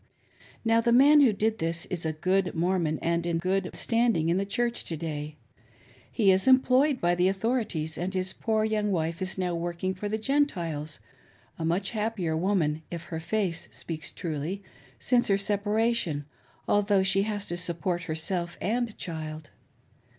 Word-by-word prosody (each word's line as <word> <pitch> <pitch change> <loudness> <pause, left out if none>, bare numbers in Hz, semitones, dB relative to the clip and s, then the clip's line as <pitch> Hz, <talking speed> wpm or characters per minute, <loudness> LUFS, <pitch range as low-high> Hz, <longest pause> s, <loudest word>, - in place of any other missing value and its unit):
Now 225 0 +4
the 235 +1 +2
man 285 +5 +7
who 260 -5 +6
did 215 +2 0
this 165 +1 0
is 175 -3 -1
a - - 0
good 185 +4 0
Mormon 170 -2 +1
in 170 0 0
good 185 +2 0
standing 230 -9 +1
in 170 - +2
the 195 +1 -1
Church 240 +3 -1
to 165 - -4
day. 150 -1 -5 0.7
He 205 -5 +4
is 190 +6 +2
employed 260 +1 +4
by 175 0 +2
the 180 +1 +2
authorities 195 -6 -1
and 180 +2 -2
his 185 0 -1
poor 220 -1 0
young 210 -1 0
wife 165 -1 -1
is 185 +1 -3
now 180 -2 -1
working 175 +2 -2
for 205 +3 -5
the 215 - -1
Gentiles 175 - -1 0.3
— - - -31
a 160 - -2
much 180 +4 +1
happier 210 -7 -1
woman, 160 -3 +1
if 170 -1 -6
her 160 - -2
face 180 0 -2
speaks 155 -2 -6
truly, 170 +3 -4 0.3
since 245 - +2
her 195 - +3
separation, 205 -5 0 0.4
although 205 -1 +3
she 195 +1 +3
has 205 -1 -2
to 175 - -2
support 175 0 -2
herself 170 +2 -2
and 235 +1 -1
child. 155 -3 -6
185 Hz, 165 wpm, -27 LUFS, 165-215 Hz, 0.7 s, man